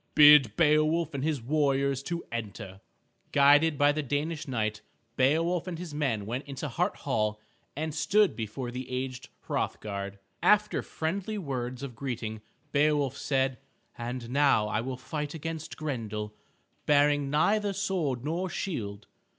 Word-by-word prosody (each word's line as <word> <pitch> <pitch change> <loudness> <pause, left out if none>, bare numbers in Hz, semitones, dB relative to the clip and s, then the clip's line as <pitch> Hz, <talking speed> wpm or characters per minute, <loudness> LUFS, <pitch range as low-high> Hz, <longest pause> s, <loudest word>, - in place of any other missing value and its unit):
Bid 145 -7 +8
Beowulf 155 +1 +3
and 135 -1 -3
his 150 -6 -1
warriors 140 -1 +1
to 170 +4 -4
enter." 105 -4 -6 0.5
Guided 145 +2 +5
by 145 +1 +5
the 155 +1 -1
Danish 150 +3 -2
knight, 110 -4 -1 0.3
Beowulf 165 +7 +2
and 175 -2 -4
his 170 -3 -7
men 130 -9 -1
went 120 +6 -3
into 140 +1 -5
Hart 180 - 0
Hall 105 -6 0 0.4
and 155 +2 -3
stood 205 +5 +3
before 120 +3 -4
the 125 +1 -6
aged 130 0 -4
Hrothgar. 100 -2 -3 0.3
After 210 0 +3
friendly 195 +7 -3
words 130 -6 -4
of 130 -4 -6
greeting 115 -4 -4 0.3
Beowulf 145 -2 +2
said, 135 -2 0 0.4
"And 120 0 -5
now 140 -6 +4 0.2
will 130 +2 -4
I - - -15
fight 150 +2 -4
against 160 0 -5
Grendel, 110 -8 -4 0.5
bearing 145 -1 +4
neither 200 +8 +2
sword 175 -10 -1
nor 175 +5 -1
shield. 105 - -4
140 Hz, 140 wpm, -29 LUFS, 120-155 Hz, 0.5 s, Bid